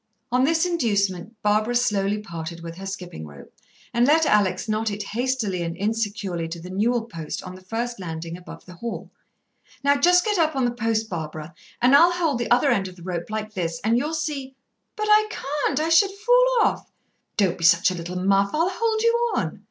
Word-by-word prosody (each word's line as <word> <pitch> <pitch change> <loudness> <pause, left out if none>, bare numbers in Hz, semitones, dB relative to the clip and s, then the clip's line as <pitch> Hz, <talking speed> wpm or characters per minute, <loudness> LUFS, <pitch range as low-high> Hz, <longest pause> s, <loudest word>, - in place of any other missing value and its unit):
On 250 +1 +3
this 325 +3 +2
inducement 210 - -1
Barbara 215 +3 +2
slowly 210 -4 +1
parted 170 -4 -7
with 165 0 -8
her 195 +1 -7
skipping 180 - -7
rope, 70 -1 -14 0.4
and 240 +1 +3
let 320 +2 +4
Alex 205 - +2
knot 215 +1 0
it 205 0 -4
hastily 225 -4 -2
and 165 0 -4
insecurely 205 -5 -2
to 165 +1 -7
the 180 +2 -9
newel 225 +5 +1
post 165 -9 -6
on 185 - -8
the 185 - -12
first 230 +4 -4
landing 165 -2 -6
above 180 0 -11
the 180 - -12
hall. 230 +7 -6 0.7
"Now 285 0 +4
just 360 +6 +4
get 420 -4 +1
up 315 -2 +2
on 265 - +1
to 245 - +2
the - - -10
post, 225 -2 0
Barbara, 160 -2 -6 0.3
and 255 +3 +6
I'll 345 +4 +6
hold 325 -8 0
the 240 - -2
other 245 +1 +4
end 195 -1 +1
of 185 - -11
the 175 - -14
rope 175 0 -4
like 215 0 -4
this, 165 -3 -3
and 225 +2 +2
you'll 295 +6 0
see 290 -4 -4 0.2
" - - -53
"But 425 - -1
I 425 0 +5
can't, 295 -6 -2
I 315 +1 0
should 360 +5 +5
fall - - +3 0.2
off." - - -1 0.5
"Don't 190 -5 +1
be - - -6
such 170 +2 +5
a - - -4
little 175 +1 -5
muff; 195 +1 +3
I'll 335 +4 +1
hold 440 +2 0
you 470 0 +2
on." - - -2
215 Hz, 215 wpm, -24 LUFS, 180-285 Hz, 0.7 s, and